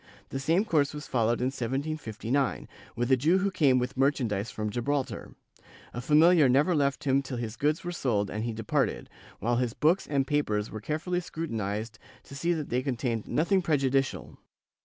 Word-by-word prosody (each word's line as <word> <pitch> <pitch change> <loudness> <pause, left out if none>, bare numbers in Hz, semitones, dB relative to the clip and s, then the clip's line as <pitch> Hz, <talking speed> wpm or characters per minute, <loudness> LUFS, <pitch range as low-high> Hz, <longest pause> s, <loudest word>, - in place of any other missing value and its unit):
The 135 - -4
same 165 +9 +2
course 150 -7 +1
was 150 - -6
followed 120 -1 +1
in 130 +1 +1
1759, 135 -1 -2 0.3
with 120 +2 -1
a - - +7
Jew 155 +9 +3
who 195 +1 0
came 140 -8 +3
with 125 +1 -2
merchandise 125 -6 0
from 105 -1 -4
Gibraltar; 130 +4 -3 0.6
a 120 - -4
familiar 155 +2 +5
never 145 +8 +3
left 140 -3 0
him 135 0 +2
till 130 -2 -6
his 115 -1 -4
goods 150 +2 0
were 175 - -3
sold 110 - -1
and 110 +2 -3
he 115 - -2
departed, 110 -1 -1 0.3
while 120 +1 0
his 125 -2 0
books 170 +5 +2
and 140 -2 +1
papers 110 -8 0
were 110 - -6
carefully 155 - -2
scrutinized 110 - -4 0.2
to - - -13
see 165 +5 0
that 155 -4 -2
they 125 +1 0
contained 120 -4 -2
nothing 185 +5 +2
prejudicial. 135 -5 0
135 Hz, 180 wpm, -28 LUFS, 115-150 Hz, 0.6 s, a